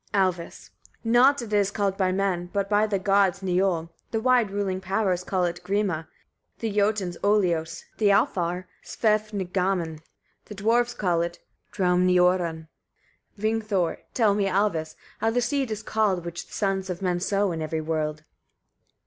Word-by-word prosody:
Alvis. 185 -3 -1 0.3
31. 225 - -1
Nott 270 +3 +5
it 215 -2 -7
is 200 -2 +3
called 200 -2 -1
by 190 -2 +1
men, 185 -2 -1
but 200 -1 -1
by 210 +1 +3
the 205 -2 0
gods 195 0 +2
niol; 180 -3 0 0.2
the 225 - -1
wide 245 -2 +3
ruling 195 -2 -2
powers 190 -1 0
call 185 -1 0
it 175 0 -3
grima, 190 -5 -1 0.5
the 225 -2 -3
Jotuns 200 -4 +1
olios, 175 -6 +1 0.2
the 215 - +3
Alfar 180 -2 +1 0.2
svefngaman; 195 -6 -1 0.5
the 210 - -9
Dwarfs 235 +4 +1
call 175 -4 +1
it 170 0 -3 0.3
draumniorunn. 180 -3 +2 0.7
Vingthor. 215 -4 0
32. - - -28
Tell 220 -4 +4
me, 200 -1 +1
Alvis! 195 -2 +1
etc., 155 0 -9 0.2
how 225 - +1
the 235 +2 +1
seed 265 +1 0
is 215 0 -4
called, 205 -6 0
which 170 0 -6
the - - -16
sons 195 -2 -1
of 180 +1 -4
men 180 -1 0
sow 200 +1 +1
in 165 -1 -4
every 160 +1 -2
world. 155 -1 -2
195 Hz, 160 wpm, -25 LUFS, 175-210 Hz, 0.7 s, Nott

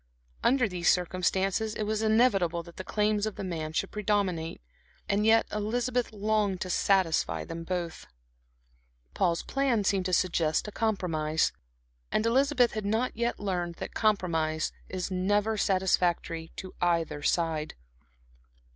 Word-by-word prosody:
Under 250 -2 +3
these 180 -3 0
circumstances, 190 +4 +1
it 215 - -2
was 215 +1 -1
inevitable 205 -7 +3
that 170 0 -14
the 185 - -5
claims 210 +1 +1
of 215 - -5
the - - -5
man 160 -4 -3
should 190 +4 -2
predominate. 200 -6 -1 0.5
And 210 +2 +1
yet 225 0 +5
Elizabeth 240 +4 -1
longed 210 -2 0
to 185 - -2
satisfy 190 -5 +1
them 165 0 -6
both. 175 -1 -4 1.1
Paul's 170 -2 +1
plan 270 -6 +1
seemed 190 -1 +1
to 185 - -3
suggest 170 -1 +1
a - - -5
compromise. 165 -8 0 0.6
And 215 - +1
Elizabeth 255 +1 +3
had 215 -1 -4
not 220 +5 0
yet 235 +1 -1
learned 180 -4 -2
that - - -7
compromise 165 -7 +1 0.2
is 185 +1 -4
never 205 +4 +1
satisfactory 180 -4 +1
to 185 - -8
either 165 -4 +1
side. 160 -1 0
190 Hz, 140 wpm, -29 LUFS, 170-215 Hz, 1.1 s, yet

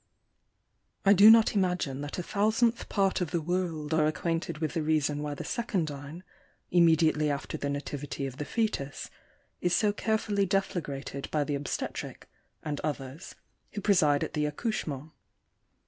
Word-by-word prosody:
— - - -45
I 200 - +7
do 205 +2 +9
not 225 0 +7
imagine 180 -9 0
that 145 0 -5
a 180 - -2
thousandth 220 +5 +1
part 195 -2 +1
of 175 - -1
the 170 - 0
world 165 -2 -2
are 155 -1 +3
acquainted 165 +1 -2
with 155 -1 -2
the 165 - -1
reason 150 -1 +1
why 150 -1 -3
the - - -6
secundine, 160 - -3 0.5
immediately 160 -3 +4
after 140 -1 -3
the 140 - -3
nativity 140 0 -4
of 135 -1 -6
the 150 - -4
foetus, 145 -10 -2 0.5
is 175 0 +1
so 210 -2 +2
carefully 210 -2 0
deflagrated 150 -8 -2
by 150 -1 +1
the 145 - -3
obstetric 140 0 -4 0.4
and 150 -2 -3
others, 140 -1 -5 0.4
who 205 - -4
preside 155 -8 +3
at - - -5
the 150 -1 0
accouchement. 150 - -3
160 Hz, 155 wpm, -29 LUFS, 145-195 Hz, 0.5 s, do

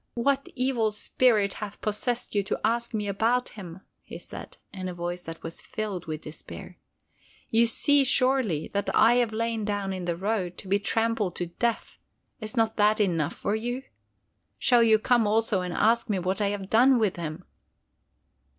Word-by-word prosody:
"What 275 +3 +1
evil 250 -4 +1
spirit 210 -1 +2
hath 210 -1 -6
possessed 235 +3 -2
you 205 - +2
to - - -2
ask 235 +1 0
me 210 -3 -2
about 230 +5 +1
him?" 185 -5 -10 0.2
he - - -9
said, - - -10 0.2
in 185 -2 -5
a 180 - -7
voice 175 +1 -4
that 165 0 -8
was 165 0 -6
filled 200 -6 -5
with 155 -1 -4
despair. 155 - -9 0.7
"You 230 +1 +4
see, 285 +5 +4
surely, 255 - +1
that 200 0 -2
I 235 +2 +5
have 240 -3 +2
lain 225 0 -2
down 205 -2 -2
in 185 -1 -5
the 170 -1 -1
road 190 -1 -2
to - - -9
be 200 +2 +2
trampled 225 -3 0
to 175 - -2
death. 230 +7 -3 0.4
Is 215 +2 -6
not 225 -1 +1
that 210 +1 +3
enough 170 -6 0
for 205 - -2
you? 245 +4 -3 0.7
Shall 245 -2 +4
you 220 -1 +5
come 235 0 +2
also 215 -2 +1
and 180 0 -4
ask 230 +6 +2
me 205 - +1
what 185 +3 -2
I 205 - +2
have 200 -1 -3
done 250 +5 +5
with 215 -6 0
him?" 165 +1 -5
215 Hz, 180 wpm, -27 LUFS, 190-235 Hz, 0.7 s, I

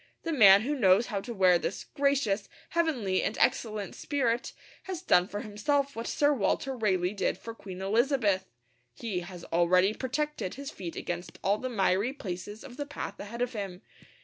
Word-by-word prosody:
The 330 - -2
man 200 -7 +8
who 285 +5 -1
knows 205 -4 +4
how 205 -5 -3
to 240 - -7
wear 185 -5 +4
this - - -3
'gracious, 270 -8 0 0.2
heavenly, 260 - +1
and 205 - -2
excellent 215 -6 +1
spirit' 250 -4 -1 0.3
has 370 -2 -5
done 180 - +4
for 205 +1 -5
himself 280 +7 -1
what 230 +1 -4
Sir 290 0 +3
Walter 260 +3 0
Raleigh 190 -5 +1
did 200 - -1
for 230 - -8
Queen 190 -4 -8
Elizabeth. 210 -3 +2 0.5
He 205 - -3
has 175 0 -9
already 180 +4 +4
protected 275 -4 -3
his 280 +2 -6
feet 175 -3 -7
against 175 +1 -5
all 200 +2 +2
the 255 - -3
miry 200 +2 +1
places 205 -3 -6
of 260 -2 -11
the 290 - -3
path 245 -8 -6
ahead 235 +4 -4
of 245 0 -3
him. 195 -4 -5
215 Hz, 175 wpm, -29 LUFS, 190-265 Hz, 0.5 s, man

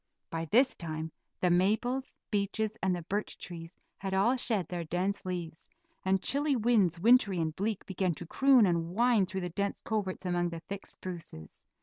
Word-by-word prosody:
By 165 0 -2
this 250 - +4
time 160 -1 -5 0.3
the 180 - +3
maples, 220 +9 +1 0.2
beeches, 215 +1 0
and 190 -1 +2
the 175 - -5
birch 205 +5 -3
trees 170 -1 -8 0.2
had 190 -1 -2
all 215 +7 +4
shed 220 -8 0
their 175 -1 -3
dense 185 +4 -2
leaves, 170 -3 -5 0.3
and 190 0 +1
chilly 285 +1 +2
winds, 210 -8 +3
wintry 215 -2 +5
and 160 -2 -1
bleak, 210 0 -2
began 185 -2 -1
to 175 - -6
croon 265 +5 +5
and 170 -1 0
whine 235 -4 +4
through 190 +1 -3
the 180 - -3
dense 200 +3 -2
coverts 200 -4 -3
among 175 -1 +1
the 165 -1 -7
thick 195 +2 -7
spruces. 165 - -9
190 Hz, 180 wpm, -31 LUFS, 175-215 Hz, 0.3 s, wintry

